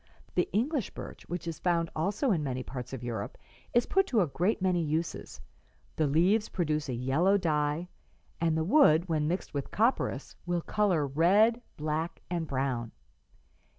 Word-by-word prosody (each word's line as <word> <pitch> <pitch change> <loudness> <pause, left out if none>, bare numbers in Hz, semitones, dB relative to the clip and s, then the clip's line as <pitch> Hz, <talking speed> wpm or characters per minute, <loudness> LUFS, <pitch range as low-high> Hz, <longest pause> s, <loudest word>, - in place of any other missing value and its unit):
The 180 - +1
English 245 - 0
birch, - - -9
which 175 -1 -4
is 165 -2 -4
found 170 -2 +1
also 205 - 0
in 170 -6 +1
many 130 -2 -3
parts 125 -1 -7
of 130 -2 -6
Europe, 115 -4 -4 0.3
is 240 0 +3
put 385 0 +2
to 230 - +2
a - - +3
great 180 +9 0
many 185 -2 +1
uses; 160 +1 -3 0.6
the 155 - +1
leaves 180 +9 +3
produce 155 -4 -1
a 125 - -1
yellow 145 +11 +2
dye, 155 -1 0 0.5
and 165 -1 +1
the 160 - +1
wood, 180 - +5
when 155 -3 0
mixed 180 +4 -3
with 140 -2 -3
copperas, 220 - 0
will 175 0 -1
color 190 -8 +1
red, 195 - +4 0.2
black 155 +2 -3
and 170 -2 -1
brown. 130 -4 -2
165 Hz, 165 wpm, -30 LUFS, 150-190 Hz, 0.6 s, wood